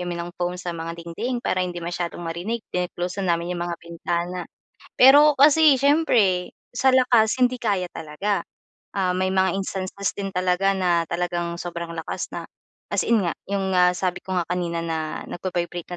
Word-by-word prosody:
kami 175 -1 -3
ng 170 +1 -5
foam 175 0 0
sa 180 -1 -5
mga 165 0 -5
dingding 205 +9 -4
para 185 - +1
hindi 180 -1 -2
masyadong 175 0 -4
marinig, 180 +8 -3
then 180 0 0
kino-close 180 +3 -4
namin 170 -2 0
yung 175 - -4
mga 175 - -2
bintana. 170 +1 -3 0.5
Pero 290 +3 +8
kasi 300 0 +7
siyempre 240 - +3 0.2
sa 260 +2 +3
lakas 250 -3 +4
hindi 250 0 +3
kaya 200 -5 0
talaga. 195 +7 -2 0.5
Ah, 190 -2 +1
may 185 +1 0
mga 190 -1 +3
instances 195 0 -3
din 195 -1 -3
talaga 185 +1 +1
na 175 -3 +2
talagang 175 0 -2
sobrang 170 -1 -5
lakas 160 - -4
na - - -6 0.5
as - - +2
in 235 - +3
nga 170 - 0 0.2
yung 195 -1 -1
nga 180 -1 +5
sabi 180 -1 -2
ko 190 - -8
nga 175 - 0
kanina 175 -2 -2
na 160 -1 -3
nagba-vibrate 175 -1 -4
180 Hz, 175 wpm, -23 LUFS, 170-200 Hz, 0.5 s, Pero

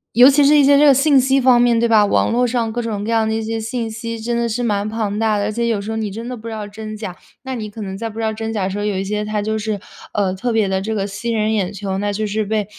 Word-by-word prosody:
尤 250 +3 +9
其 280 0 +4
是 295 +1 +6
一 290 - +6
些 280 +1 +5
这 300 - +6
个 280 - +7
信 275 +1 +4
息 265 +1 +2
方 250 -1 +5
面 240 -1 +3
对 235 0 +2
吧？ 215 -2 +5
网 200 - +1
络 245 +1 +2
上 230 -2 -1
各 240 +1 -2
种 210 -3 -3
各 225 - -3
样 225 -1 +2
的 220 - 0
一 225 - -1
些 225 +1 -3
信 225 0 -3
息 230 +1 -5
真 235 +2 -2
的 235 - 0
是 235 +2 -2
蛮 205 -2 0
庞 215 -2 -2
大 220 -2 +2
的， 205 - -1
而 210 - -1
且 235 +2 -1
有 215 -3 0
时 215 - -5
候 220 - -3
你 215 -2 -2
真 225 +4 -7
的 250 - -5
不 225 - -10
知 225 - -5
道 215 -1 -5
真 215 +1 -8
假， 210 -4 -6 0.3
那 265 0 -5
你 215 -3 -5
可 215 +1 -9
能 190 -1 -5
在 225 +2 -4
不 220 - -12
知 225 - -2
道 220 - +1
真 225 +1 -4
假 205 - -1
的 185 - -1
时 200 +2 -4
候， 205 - -2
有 205 -2 -1
一 190 - -1
些 210 +1 -2
它 210 0 -2
就 220 +1 -2
是， 215 -1 -2 0.4
呃， 195 -3 0
特 235 +5 -2
别 215 -3 +2
地 190 0 0
这 220 +2 -3
个 195 -1 -1
吸 205 +4 -4
人 220 0 0
眼 200 -2 -1
球， 195 -1 -4
那 205 +1 -1
就 215 +2 -2
是 210 +1 -1
被 210 -1 -1
220 Hz, 365 characters per minute, -19 LUFS, 205-235 Hz, 0.4 s, 尤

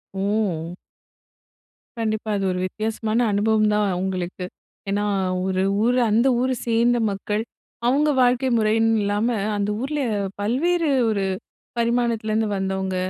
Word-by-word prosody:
ஓ! 190 -4 -1 1.3
கண்டிப்பா. 220 -1 -2
அது 195 - -1
ஒரு 180 - -2
வித்தியாசமான 220 +2 -2
அனுபவம் 215 +1 +2
தான் 210 0 +2
அவங்களுக்கு. 185 0 -3 0.4
ஏன்னா, 205 +1 0 0.4
ஒரு 190 0 0 0.2
ஊர் 245 +2 +2
அந்த 230 +5 +3
ஊரை 255 +1 +1
சேர்ந்த 235 +1 +3
மக்கள், 210 +2 -2 0.4
அவங்க 290 +4 +3
வாழ்க்கை 250 +1 +3
முறைன்னு 225 +1 +2
இல்லாம, 205 +3 0 0.3
அந்த 205 0 -1
ஊரில 295 +3 -2 0.4
பல்வேறு 320 +10 +1 0.2
ஒரு 205 -3 0 0.5
பரிமாணத்துலேருந்து 230 -2 0
வந்தவங்க, 190 0 -2
215 Hz, 115 wpm, -23 LUFS, 200-235 Hz, 1.3 s, அந்த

